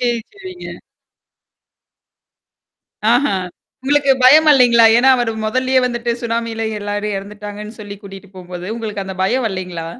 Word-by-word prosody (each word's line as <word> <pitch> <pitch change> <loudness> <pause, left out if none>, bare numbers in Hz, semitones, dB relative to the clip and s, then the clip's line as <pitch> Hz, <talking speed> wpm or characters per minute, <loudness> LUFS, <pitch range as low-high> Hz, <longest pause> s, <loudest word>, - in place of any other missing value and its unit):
சரி, 240 -1 0
சரிங்க. 375 -2 -10 2.3
ஆஹா. 250 -2 +2 0.5
உங்களுக்கு 280 0 +2
பயம் 310 +4 +7
வரலேங்களா? 245 -5 +6
ஏன்னா, 265 +2 +4
அவரு 240 -2 -1
மொதல்லயே 255 +3 +1
வந்துட்டு 240 -1 -3
சுனாமியில 230 -1 -3 0.2
எல்லாரும் 205 0 -3
இறந்துட்டாங்கன்னு 210 +2 -9
சொல்லி 205 -1 -8
கூட்டிட்டு 195 0 -12
போம்போது, 180 0 -9
உங்களுக்கு 210 -4 -5
அந்த 190 - -7
பயம் 245 +7 0
வரலேங்களா? 180 -4 -5
225 Hz, 120 wpm, -17 LUFS, 200-255 Hz, 2.3 s, பயம்